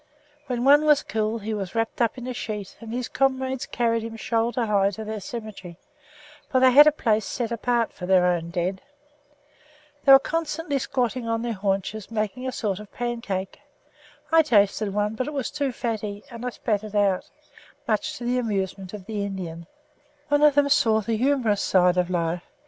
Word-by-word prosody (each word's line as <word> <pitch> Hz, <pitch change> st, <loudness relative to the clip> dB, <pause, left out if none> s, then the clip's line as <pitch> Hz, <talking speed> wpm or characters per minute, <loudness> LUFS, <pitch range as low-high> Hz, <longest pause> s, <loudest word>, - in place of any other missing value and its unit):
When 245 Hz, -2 st, -2 dB
one 290 Hz, +2 st, +6 dB
was 300 Hz, -1 st, +4 dB
killed, 220 Hz, 0 st, -2 dB
he 220 Hz, +1 st, -3 dB
was 195 Hz, -2 st, -5 dB
wrapped 225 Hz, +1 st, -1 dB
up 230 Hz, +1 st, +1 dB
in 245 Hz, -, -7 dB
a 255 Hz, -, -4 dB
sheet 210 Hz, -4 st, -5 dB
and 225 Hz, -1 st, -9 dB
his 245 Hz, +1 st, -3 dB
comrades 265 Hz, -1 st, 0 dB
carried 230 Hz, -1 st, 0 dB
him 225 Hz, 0 st, -6 dB
shoulder 230 Hz, +2 st, 0 dB
high 200 Hz, -2 st, +2 dB
to 205 Hz, +2 st, -7 dB
their 215 Hz, 0 st, -5 dB
cemetery, 200 Hz, -5 st, -8 dB, 0.7 s
for 260 Hz, -, +2 dB
they 260 Hz, 0 st, +6 dB
had 295 Hz, +4 st, +9 dB
a -, -, +7 dB
place 220 Hz, -7 st, +1 dB
set 235 Hz, +3 st, -3 dB
apart 235 Hz, 0 st, 0 dB
for 180 Hz, -, -7 dB
their 185 Hz, -1 st, +4 dB
own 170 Hz, -2 st, 0 dB
dead. 180 Hz, +2 st, -2 dB, 1.2 s
They 275 Hz, -, +6 dB
were 270 Hz, -, +12 dB
constantly 315 Hz, 0 st, -2 dB
squatting 250 Hz, -3 st, -2 dB
on 230 Hz, 0 st, -1 dB
their 235 Hz, -1 st, -2 dB
haunches 195 Hz, +1 st, -2 dB
making 225 Hz, +3 st, -3 dB
a -, -, -1 dB
sort 205 Hz, -6 st, -2 dB
of 210 Hz, -1 st, -11 dB
pancake. 230 Hz, -6 st, -4 dB, 0.7 s
I 325 Hz, 0 st, +7 dB
tasted 210 Hz, -6 st, +2 dB
one; 210 Hz, +1 st, 0 dB
but 255 Hz, +4 st, -3 dB
it 300 Hz, -, -4 dB
was 275 Hz, -5 st, -3 dB
too 285 Hz, -2 st, -1 dB
fatty 215 Hz, -4 st, -4 dB
and 235 Hz, 0 st, -8 dB
I 250 Hz, -, -1 dB
spat 215 Hz, -3 st, -2 dB
it 215 Hz, -1 st, -8 dB
out, 200 Hz, -3 st, +1 dB, 0.6 s
much 310 Hz, 0 st, -1 dB
to 245 Hz, -, -8 dB
the 250 Hz, +1 st, +1 dB
amusement 195 Hz, -4 st, -3 dB
of 195 Hz, -3 st, -10 dB
the 210 Hz, -1 st, -3 dB
Indians. 170 Hz, -4 st, -6 dB, 0.6 s
One 290 Hz, 0 st, +3 dB
of 300 Hz, -2 st, +5 dB
them 285 Hz, -1 st, +3 dB
saw 220 Hz, -5 st, +3 dB
the 225 Hz, +2 st, -1 dB
humorous 240 Hz, -4 st, +1 dB
side 180 Hz, -1 st, +3 dB
of 180 Hz, 0 st, +1 dB
life. 170 Hz, -1 st, -1 dB
225 Hz, 195 wpm, -24 LUFS, 200-255 Hz, 1.2 s, were